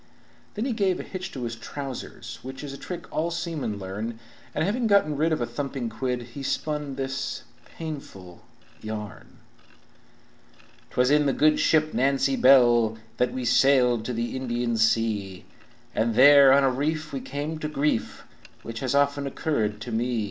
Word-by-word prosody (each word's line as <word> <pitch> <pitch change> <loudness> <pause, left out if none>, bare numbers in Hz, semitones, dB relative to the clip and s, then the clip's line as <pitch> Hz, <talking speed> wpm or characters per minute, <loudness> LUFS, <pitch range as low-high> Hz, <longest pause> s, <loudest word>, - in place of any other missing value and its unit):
Then 215 +3 -2
he 260 - -1
gave 195 -5 +1
a - - -4
hitch 185 0 -6
to 130 - -5
his 115 -1 -3
trousers, 120 -1 -7
which 130 +2 -8
Is 140 -2 -6
a - - -7
trick 180 -1 -6
all 160 +2 0
seamen 165 - -3
larn, 100 +4 -5 0.4
And 155 - +1
having 230 +4 0
got 200 -6 +4
rid 155 +2 0
of 155 - 0
a - - +1
thumping 130 0 -4
quid, 125 -2 -2
He 140 - -7
spun 150 0 -2
this 135 0 -4 0.2
painful 120 - -9 0.4
yarn: 110 -1 -7 1.5
"'Twas 125 +2 +2
in 150 0 +4
the 135 - +2
good 155 +2 +3
ship 155 -1 +2
Nancy 135 +1 +2
Bell 120 -4 +5 0.2
That 125 0 +1
we 130 -1 -4
sailed 125 -2 +4
to 125 - -3
the 115 +2 -3
Indian 120 -2 -1
sea, 110 -4 0 0.5
And 110 0 0
there 140 +1 +8
on 140 +1 +5
a 135 - +3
reef 155 +4 -2
we 135 - -3
come 150 +3 -4
to 155 - -3
grief, 150 -5 -1 0.4
Which 115 0 -6
has 130 0 -1
often 140 0 +2
occurred 115 -8 -1
to 120 - -6
me. 120 +1 0
135 Hz, 170 wpm, -25 LUFS, 120-150 Hz, 1.5 s, there